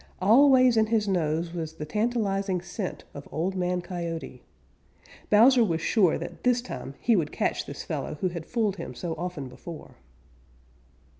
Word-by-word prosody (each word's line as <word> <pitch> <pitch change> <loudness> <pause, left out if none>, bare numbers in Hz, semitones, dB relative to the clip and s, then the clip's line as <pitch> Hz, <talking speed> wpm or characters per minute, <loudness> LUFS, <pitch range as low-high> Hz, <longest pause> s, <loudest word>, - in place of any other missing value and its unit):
Always 255 +4 +6
in 220 0 +4
his 215 -2 +1
nose 165 -2 0
was 160 -2 -4
the 150 - -6
tantalizing 200 -1 0
scent 180 +2 -5
of 140 - -9
Old 175 +5 -1
Man 180 -1 0
Coyote. 170 -3 -5 0.9
Bowser 240 +4 +6
was 165 -6 0
sure 185 -1 +3
that 170 - -8
this 250 -1 +3
time 140 - -7
he 230 - +3
would 160 -6 0
catch - - -1
this - - -7
fellow - - -4
who 185 +5 -1
had 170 -2 -7
fooled 215 -5 0
him 165 -7 -7
so 165 +7 -4
often 165 -4 -5
before. 150 +6 -10
180 Hz, 160 wpm, -27 LUFS, 165-220 Hz, 0.9 s, Always